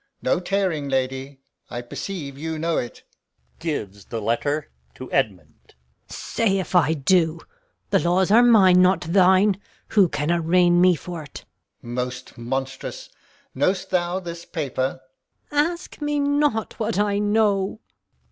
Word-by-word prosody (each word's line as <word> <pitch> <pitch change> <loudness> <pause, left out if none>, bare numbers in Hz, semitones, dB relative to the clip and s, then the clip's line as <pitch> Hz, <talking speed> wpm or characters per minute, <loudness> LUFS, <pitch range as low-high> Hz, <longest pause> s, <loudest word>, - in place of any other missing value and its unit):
No 130 - +2
tearing, 180 -6 -1
lady! 135 +1 -2 0.3
I 120 0 -5
perceive 140 +2 -6
you 160 +3 -4
know 165 +1 0
it. 120 - -5 0.6
Gon. 150 - -3 2.2
Say 215 -4 -1
if 190 - -4
I 160 -3 +4
do 165 +2 +2 0.5
the - - +4
laws 180 +3 +2
are 230 +3 +7
mine, 195 -7 +6
not 185 0 +4
thine. 190 +3 +3 0.3
Who 195 -5 +4
can 150 +2 -1
arraign 175 +1 +3
me 180 -1 +5
for't? 160 -3 -8
Alb. - - -27 0.5
Most 125 0 -4
monstrous! 130 +2 -5 0.4
Know'st 185 +7 0
thou 180 0 0
this 170 -2 -7
paper? 135 -5 -3 0.5
Gon. 290 - +1
Ask 345 -2 -11
me 295 0 0
not 285 -6 0
what 220 -2 -1
I 205 0 +1
know. 205 -1 +1
175 Hz, 125 wpm, -23 LUFS, 145-195 Hz, 2.2 s, are